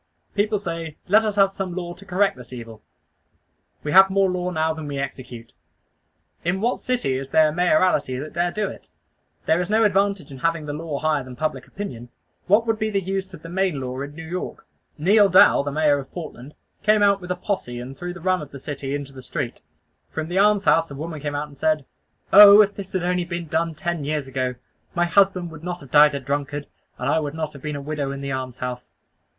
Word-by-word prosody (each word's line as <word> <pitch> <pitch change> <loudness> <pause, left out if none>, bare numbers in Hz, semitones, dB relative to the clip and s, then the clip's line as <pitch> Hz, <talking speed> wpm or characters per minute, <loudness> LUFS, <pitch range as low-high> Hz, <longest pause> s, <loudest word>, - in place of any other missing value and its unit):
People 210 +1 +1
say 165 -5 -5
"Let 215 +4 +5
us 210 -2 -1
have 195 -1 +4
some 190 -3 -4
law 175 -2 -4
to 200 +3 -16
correct 195 +1 +2
this 125 -1 -13
evil." 115 -3 -9 1.0
We 150 - -2
have 190 +2 +8
more 195 -1 +2
law 180 0 -2
now 160 -2 0
than 160 -1 -7
we 140 -1 -4
execute. 125 -4 -6 0.9
In 175 +3 0
what 235 +4 0
city 245 - -1
is 135 0 -7
there 155 +2 +5
a - - -3
mayoralty 160 -6 +2
that 150 +4 -6
dare 175 +1 +1
do 210 +3 -1
it? - - -10 0.6
There 160 +2 +3
is 180 - -4
no 220 +1 +3
advantage 200 -6 +1
in 135 - -9
having 165 0 0
the 145 - -4
law 155 -1 -4
higher 150 -2 0
than 130 0 -10
public 145 -2 -3
opinion. 125 - -7 0.4
What 210 +4 +4
would 225 -1 0
be 215 -1 0
the 200 -2 0
use 195 0 -3
of 160 - -16
the 165 - -8
Maine 185 -4 0
Law 130 0 -4
in 145 +1 -7
New 160 0 -8
York? 180 +2 -5 0.3
Neal 200 +6 +5
Dow, 185 -5 +6
the 145 0 -3
Mayor 150 -1 +2
of 135 - -9
Portland, 150 -5 -9 0.3
came 210 0 +4
out 200 -1 +4
with 180 - -9
a 180 - 0
posse 180 - -3
and 130 +2 -8
threw 175 +4 -5
the 175 0 -10
rum 185 0 +1
of 150 - -8
the 140 - -9
city 140 0 -5
into 140 -1 -6
the 130 - -10
street. 130 - -5 0.5
From 160 0 -4
the 180 +2 +1
alms 205 -1 +4
house 165 0 +4
a 140 - -8
woman 155 +1 -6
came 145 0 -3
out 145 +1 -2
and 145 - -16
said, 155 -1 0 0.5
"Oh! 205 0 +11
if 205 0 -3
this 195 -1 -9
had 185 -2 -1
only 180 0 +1
been 170 0 -5
done 160 +1 -1
ten 175 -2 -3
years 145 -1 -2
ago, 130 -1 -2 0.4
my 175 0 +2
husband 185 -1 +2
would 160 -1 -11
not 180 0 -4
have 140 -6 -14
died 150 -1 +6
a - - -2
drunkard, 145 +2 -3 0.3
and - - -3
I 160 - +3
would 150 -1 -4
not 155 -1 -3
have 140 - -12
been 150 0 -4
a 140 - -5
widow 145 -2 -3
in 140 0 -6
the 140 0 -4
almshouse." 125 -1 -5
160 Hz, 235 wpm, -23 LUFS, 140-190 Hz, 1.0 s, Oh